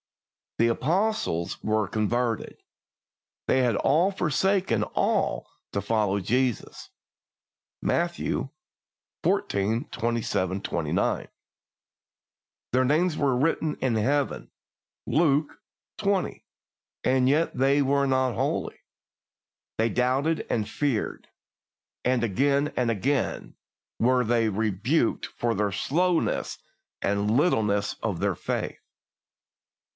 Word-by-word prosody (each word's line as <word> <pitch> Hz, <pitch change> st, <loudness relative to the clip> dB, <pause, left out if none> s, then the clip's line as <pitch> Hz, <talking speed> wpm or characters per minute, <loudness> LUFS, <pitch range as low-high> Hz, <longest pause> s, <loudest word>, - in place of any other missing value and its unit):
The 115 Hz, -, +4 dB
Apostles 155 Hz, -, 0 dB
were 110 Hz, -1 st, +1 dB
converted, 115 Hz, +3 st, -1 dB, 0.9 s
they 130 Hz, -, +3 dB
had 120 Hz, -4 st, +2 dB
forsaken 180 Hz, -, +2 dB
all -, -, 0 dB, 0.3 s
to 100 Hz, -, 0 dB
follow 100 Hz, -1 st, +1 dB
Jesus 125 Hz, +4 st, -1 dB, 0.9 s
(Matthew 170 Hz, -5 st, -1 dB, 0.7 s
xix. 110 Hz, +7 st, 0 dB
27 110 Hz, -5 st, -1 dB
29), -, -, -1 dB, 1.5 s
their 130 Hz, +1 st, +3 dB
names 155 Hz, +5 st, +2 dB
were 140 Hz, -4 st, +1 dB
written 155 Hz, +2 st, +1 dB
in 125 Hz, -3 st, -1 dB
Heaven 135 Hz, +6 st, 0 dB, 0.6 s
(Luke 150 Hz, -2 st, +2 dB
x. -, -, -22 dB, 0.4 s
20), 200 Hz, -2 st, -1 dB, 0.6 s
and 130 Hz, 0 st, +3 dB
yet 155 Hz, +4 st, +2 dB
they 135 Hz, +3 st, +3 dB
were 140 Hz, +1 st, +2 dB
not 130 Hz, -1 st, +2 dB
holy. -, -, -2 dB, 1.0 s
They 115 Hz, +1 st, +2 dB
doubted 130 Hz, +7 st, +1 dB
and 105 Hz, -3 st, 0 dB
feared, 135 Hz, -3 st, -2 dB, 0.8 s
and 125 Hz, -1 st, +1 dB
again 140 Hz, +7 st, +1 dB
and 125 Hz, -2 st, +1 dB
again 120 Hz, +4 st, -1 dB, 0.4 s
were 125 Hz, +2 st, +3 dB
they 115 Hz, -1 st, +2 dB
rebuked 110 Hz, -, 0 dB
for 120 Hz, -1 st, -2 dB
the 105 Hz, 0 st, 0 dB
slowness 170 Hz, -, 0 dB, 0.5 s
and 100 Hz, +1 st, +1 dB
littleness 105 Hz, -, +1 dB
of -, -, -2 dB
their -, -, 0 dB
faith. -, -, -3 dB
125 Hz, 100 wpm, -26 LUFS, 110-145 Hz, 1.5 s, The